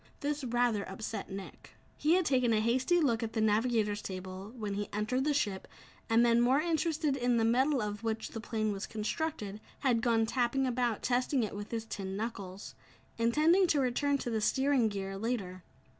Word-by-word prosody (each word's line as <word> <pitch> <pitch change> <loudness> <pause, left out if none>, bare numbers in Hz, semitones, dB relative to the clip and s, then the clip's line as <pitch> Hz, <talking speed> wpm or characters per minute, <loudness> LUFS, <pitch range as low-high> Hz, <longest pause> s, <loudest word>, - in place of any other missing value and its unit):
This 295 -1 -2
rather 240 -3 +1
upset 210 +1 -5
Nick. 195 0 -9 0.2
He 310 +2 +2
had 370 -1 +2
taken 255 -5 +2
a 215 - +3
hasty 255 +10 +2
look 245 -7 +2
at 225 -1 -3
the 225 - -1
navigator's 215 -1 +1
table 185 +2 -7
when 210 -3 -3
he 205 +1 -3
entered 220 +6 -1
the 300 - +2
ship 205 -9 -1 0.4
and 230 +1 +5
then, 235 0 +4
more 255 +4 +4
interested 315 -2 0
in 245 -2 +1
the 225 - +2
metal 260 +2 +2
of 210 +1 -4
which 220 -1 -2
the 225 - -6
plane 215 -1 -1
was 200 -1 -4
constructed, 215 -1 -3 0.2
had 245 -5 +2
gone 225 -1 +2
tapping 250 +3 +1
about, 240 -3 0
testing 250 +1 +1
it 210 - -4
with 205 0 -6
his 225 -1 -3
tin 195 -3 -5
knuckles 200 -4 -6 0.5
intending 310 +11 +4
to 305 -4 +2
return 280 +2 +1
to 245 - -4
the 220 -1 0
steering 265 0 +2
gear 195 -1 -5
later. 195 -6 -3
230 Hz, 190 wpm, -31 LUFS, 210-265 Hz, 0.5 s, and